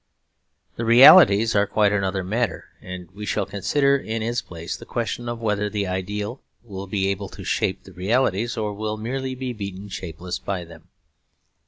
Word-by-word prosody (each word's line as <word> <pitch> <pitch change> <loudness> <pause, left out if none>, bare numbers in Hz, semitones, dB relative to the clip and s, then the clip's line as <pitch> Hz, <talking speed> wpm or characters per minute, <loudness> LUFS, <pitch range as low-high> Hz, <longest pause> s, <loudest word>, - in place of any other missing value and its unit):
The 115 - -2
realities 115 - +8
are 100 0 +3
quite 105 0 +2
another 95 -1 0
matter, 115 +6 -2
and 90 -1 -8
we 100 +3 -9
shall 105 -1 -1
consider 140 +9 +1
in 115 -4 -3
its 120 +2 -1
place 85 -1 -7
the - - -11
question 120 0 -3
of 120 -1 -4
whether 105 -1 0
the 105 -1 -2
ideal 105 +6 -4 0.2
will 100 -4 -7
be 95 0 0
able 100 0 -3
to - - -10
shape 95 - -1
the 95 - -14
realities 110 +4 0
or 105 -2 -2
will 110 +1 -3
merely 130 +4 -3
be 130 -1 -4
beaten 100 -2 -7
shapeless 90 -1 -6
by 95 -3 -4
them. 85 0 -15
105 Hz, 175 wpm, -23 LUFS, 95-115 Hz, 0.2 s, realities